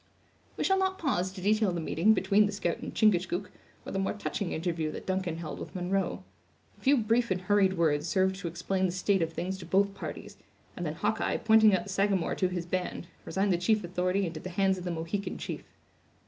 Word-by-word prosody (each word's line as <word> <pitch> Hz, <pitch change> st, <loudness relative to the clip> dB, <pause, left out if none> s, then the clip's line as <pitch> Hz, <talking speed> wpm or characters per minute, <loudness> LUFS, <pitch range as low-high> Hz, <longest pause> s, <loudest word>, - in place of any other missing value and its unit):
We -, -, -1 dB
shall 385 Hz, 0 st, +3 dB
not 380 Hz, 0 st, 0 dB
pause 190 Hz, -, 0 dB
to 190 Hz, -1 st, -9 dB
detail 215 Hz, -1 st, +3 dB
the 175 Hz, -, -2 dB
meeting 170 Hz, +6 st, +3 dB
between 200 Hz, +2 st, +3 dB
the -, -, -3 dB
scout 175 Hz, -4 st, -2 dB
and -, -, -6 dB
Chingachgook, 185 Hz, -2 st, +1 dB, 0.3 s
or -, -, -6 dB
the 195 Hz, -, -1 dB
more 195 Hz, -, 0 dB
touching 205 Hz, -2 st, -3 dB
interview 165 Hz, -2 st, -2 dB
that -, -, -7 dB
Duncan 185 Hz, -3 st, -1 dB
held 160 Hz, -3 st, -6 dB
with -, -, -8 dB
Munro. 185 Hz, +2 st, -1 dB, 0.6 s
A -, -, -23 dB
few 280 Hz, +1 st, +4 dB
brief 235 Hz, +1 st, +2 dB
and 185 Hz, -1 st, 0 dB
hurried 195 Hz, 0 st, +3 dB
words 155 Hz, -5 st, +1 dB
served 190 Hz, -1 st, +2 dB
to 190 Hz, -, -5 dB
explain 185 Hz, +3 st, -1 dB
the -, -, -2 dB
state 185 Hz, +1 st, +1 dB
of 165 Hz, 0 st, 0 dB
things 190 Hz, +3 st, -3 dB
to -, -, -8 dB
both 200 Hz, +1 st, +2 dB
parties; 195 Hz, -, -7 dB, 0.4 s
and -, -, -3 dB
then -, -, -3 dB
Hawkeye, -, -, 0 dB
pointing 220 Hz, -2 st, +5 dB
out 185 Hz, -, -1 dB
the 205 Hz, -, -10 dB
Sagamore 195 Hz, -2 st, +1 dB
to 185 Hz, -, +1 dB
his 180 Hz, -2 st, -3 dB
band, 180 Hz, 0 st, -3 dB, 0.2 s
resigned 195 Hz, 0 st, +1 dB
the 170 Hz, -, 0 dB
chief 215 Hz, +3 st, +2 dB
authority 180 Hz, +2 st, 0 dB
into 165 Hz, -2 st, -5 dB
the 185 Hz, -, -7 dB
hands 190 Hz, +1 st, +1 dB
of 180 Hz, -, -8 dB
the -, -, -2 dB
Mohican 170 Hz, +5 st, -3 dB
chief. -, -, -5 dB
190 Hz, 220 wpm, -29 LUFS, 175-205 Hz, 0.6 s, pointing